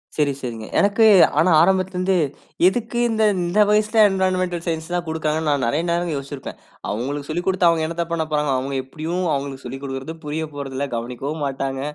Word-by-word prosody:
சரி 145 -2 +2
சரிங்க. 115 -3 -5
எனக்கு, 205 +2 +4 0.3
ஆனா, 180 +1 +4
ஆரம்பத்தில 185 +1 +2
இருந்து 185 +1 +1 0.5
எதுக்கு 240 +3 -1
இந்த 220 -1 +1 0.2
இந்த 175 +5 +2
வயசுல 215 +1 +2
என்வைரன்மென்டல் 185 -2 0
சயன்ஸ்லாம் 170 +2 -2
குடுக்காங்கன்னு 160 -1 -1
நான் 140 -4 +1
நிறைய 150 +7 +1
நேரம் 170 0 0
யோசிச்சிருப்பேன். 140 0 -7 0.3
அவுங்களுக்கு 140 +7 -3
சொல்லிக் 175 +3 -2
குடுத்து 185 -2 +3
அவுங்க 160 -1 +1
என்னத்த 170 +1 -2
பண்ணப்போறாங்க? 155 -3 0
அவுங்க 135 +1 -3
எப்படியும் 165 +6 -4
அவுங்களுக்கு 140 -1 -4
சொல்லிக் 135 +3 -7
குடுக்குறது 135 +4 -5
புரியப் 155 0 -4
போறதில்ல. 140 0 -4
கவனிக்கவும் 130 +6 -4
மாட்டாங்க, 135 0 -3
160 Hz, 160 wpm, -21 LUFS, 140-180 Hz, 0.5 s, எனக்கு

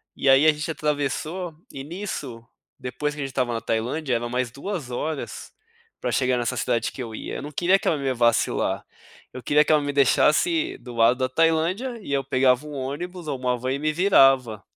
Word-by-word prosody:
e 135 - +1
aí 135 +3 +6
a 155 - +6
gente 150 +2 -4
atravessou 155 +4 -2 0.2
e 135 - -7
nisso, 150 - -6 0.4
depois 130 +4 -3
que 150 - -10
a - - -1
gente - - -5
estava 125 -2 -1
na 115 - -1
Tailândia, 120 +5 -1
era 120 0 -2
mais 125 0 -1
2 145 - -5
horas, 150 +4 -5 0.5
pra - - -2
chegar 125 -1 +2
nessa 120 +1 -1
cidade 115 -1 0
que 130 - -5
eu 115 -2 -8
ia, - - -6
eu - - -5
não 145 +2 -7
queria 180 +6 +3
que - - -6
ela 160 - +2
me 140 - -6
levasse 120 -2 +2
lá, - - -2 0.5
eu 130 - -8
queria 150 +4 +4
que - - +1
ela 155 -1 +4
me 145 0 -2
deixasse 310 - +2
do 120 -1 -11
lado 115 +2 +4
da 130 0 0
Tailândia 165 - 0
e 140 - -5
eu 135 -1 +1
pegava 130 +1 +2
um 150 - -8
ônibus 155 +6 -5
ou 140 -3 -2
uma 125 -1 -1
van 130 +2 -2
e 140 - -3
me 155 +1 0
virava. 135 - +4
140 Hz, 220 wpm, -24 LUFS, 125-155 Hz, 0.5 s, aí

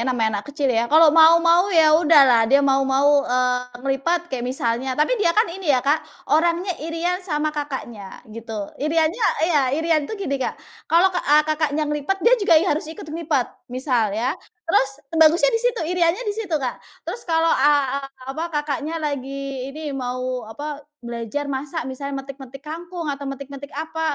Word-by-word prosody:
namanya 220 -5 0
anak 275 - -18
kecil 290 0 -4
ya. 235 0 0
Kalau 315 0 +6
mau 325 +1 +7
mau 345 +3 +4
ya 320 -5 +5
udahlah 280 -8 +5
dia 280 +1 +4
mau 270 0 +3
mau, 285 +2 +4
eee, 250 0 +1 0.2
ngelipat 335 +6 -1
kayak 260 - -2
misalnya 255 -1 -2
tapi 300 +9 +2
dia 350 - +3
kan 435 - +5
ini 380 -3 -7
ya, 260 -3 +3
Kak, 295 +3 +2 0.3
orangnya 340 +4 +2
iri-an 330 +4 -2
sama 305 -4 -2
kakaknya, 260 -9 -7
gitu. 220 -2 -7
Iri-annya 320 - 0 0.2
iya, 325 -4 +2 0.2
iri-an 320 -2 0
itu 435 - -5
gini, 275 -1 -2
Kak, - - -2 0.3
kalau 355 +3 +4
ke 355 - -1
eee, 300 +1 +4
kakaknya 310 -1 0
ngelipat 295 +5 -2
dia 470 - +5
juga 335 -5 +4
i 315 - +4
harus 310 -3 -1
ikut 320 - -9
ngelipat, 310 -6 -1 0.2
misal 250 -3 0
ya. 230 +7 -1 0.3
Terus 275 -5 +2 0.3
bagusnya 335 +10 +5
di 455 - +1
situ - - 0
iri-annya 350 +4 +1
di 415 - -1
situ, 405 -7 -2
Kak. 255 -4 -4 0.2
Terus 470 - -5
kalau, 325 0 +2
eee, 275 -1 +2 0.2
apa 270 +5 -5
kakaknya 295 +2 -3
lagi 275 -3 -4
ini 300 +1 -6
mau 255 -2 -4
apa 290 +5 -6 0.2
belajar 235 +4 -4
masak 285 +3 -4
misalnya 270 +1 -5
metik-metik 275 0 -11
kangkung 335 +2 -7
atau 280 0 -6
metik-metik 275 +1 -8
apa, 320 +1 -5
290 Hz, 175 wpm, -21 LUFS, 265-330 Hz, 0.3 s, mau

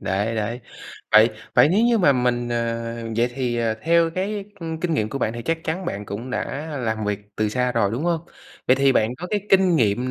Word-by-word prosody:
đấy, 100 +3 -1
đấy. 115 +3 -3 0.5
Vậy 110 +2 +7 0.2
vậy 125 +4 +6
nếu 210 +7 +3
như 235 -2 +3
mà 145 -7 +5
mình, 120 -1 0
ờ, 115 0 -2 0.2
vậy 120 +1 +2
thì, 125 -3 -1
ờ, 115 -1 0
theo 165 0 +3
cái, 195 +3 -3 0.2
ưm, 160 -1 -5
kinh 170 -2 0
nghiệm 110 -6 0
của 135 - -4
bạn 110 - 0
thì 120 0 -6
chắc 165 0 -1
chắn 180 +4 -3
bạn 105 -10 -4
cũng 115 +5 -6
đã 145 +4 -3
làm 110 -2 -2
việc 105 -1 -1 0.2
từ 110 -1 +1
xa 125 +2 0
rồi, 100 - +1
đúng 125 - -2
hông? 170 -2 +1 0.5
Vậy 130 - +5
thì 135 0 +4
bạn 110 +1 +1
có 170 +8 -7
cái 205 +2 -1
kinh 190 -3 +5
nghiệm 120 +1 +1
125 Hz, 230 wpm, -22 LUFS, 115-165 Hz, 0.5 s, Vậy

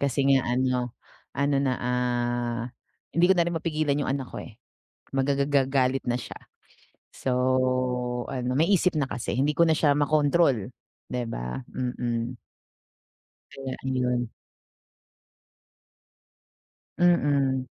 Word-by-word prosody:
Kasi 140 0 +1
nga 135 -2 +3
ano 125 -2 0 0.4
ano 140 0 +2
na, 130 -2 +1
ah, 120 -1 -1 0.5
hindi 170 +1 +5
ko - - +7
na 170 - +4
rin 175 - -1
mapigilan 155 -3 0
'yung - - -2
anak 135 -2 -3
ko, - - -5
eh, 110 - -12 0.6
magagalit 135 -1 +1
na - - +2
siya, - - -8 0.8
so 130 - -2 1.0
ano 125 -1 -2
may 165 +5 +3
isip 185 -2 +3
na 140 -3 +1
kasi 120 - -3
hindi 145 +3 +2
ko 170 - +6
na 160 - +4
siya 145 -3 +4
makontrol, 145 - +2 0.4
'di 125 -1 -2
ba? 60 - -4 0.2
Mm. 120 -1 -2 1.1
Kaya 135 -1 -6
ayun. 125 -2 0 2.7
Mm. 140 -7 +3
135 Hz, 120 wpm, -26 LUFS, 125-145 Hz, 2.7 s, ko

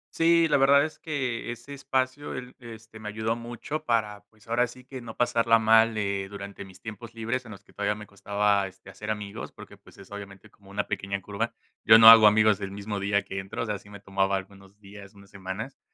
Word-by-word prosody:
Sí, 165 0 +4
la 150 - +3
verdad 140 +1 +5
es 155 - -8
que 130 -9 -3
ese 130 +4 -9
espacio 130 +1 -2
él, 125 0 -8
este, 115 -2 -12
me 105 - -6
ayudó 110 +2 -2
mucho 120 +6 -6
para, 105 -6 -1
pues, 105 +1 -26
ahora 120 +2 +2
sí 125 +2 -14
que 130 -1 -8
no 115 -2 -10
pasarla 115 -1 +3
mal, 110 0 +4
eh, 100 -2 -2
durante 100 0 -8
mis 95 -1 -15
tiempos 110 +2 -9
libres 115 +3 -3
en 110 - -10
los 100 - -12
que - - -23
todavía 105 +1 -1
me 105 0 -10
costaba, 100 0 0
este, 95 - -14
hacer - - -8
amigos, 105 -2 -5
porque, - - -13
pues, - - -20
es 100 0 -15
obviamente 100 0 -10
como 100 -1 -21
una 100 +1 -2
pequeña 100 0 -3
curva. 105 +4 -3 0.3
Yo 110 0 +8
no 115 0 +10
hago 115 -1 +10
amigos 105 -1 +4
el 95 - -3
mismo 100 +1 -5
día 100 0 +1
que 95 0 -5
entro, 95 +3 -5
o - - -3
sea, 105 -2 -3
sí 100 - -18
me 100 -1 -11
tomaba 95 0 0
algunos 95 +1 -12
días, 100 0 -13
unas 100 0 -17
semanas, 100 +6 -7
105 Hz, 225 wpm, -27 LUFS, 100-115 Hz, 0.3 s, no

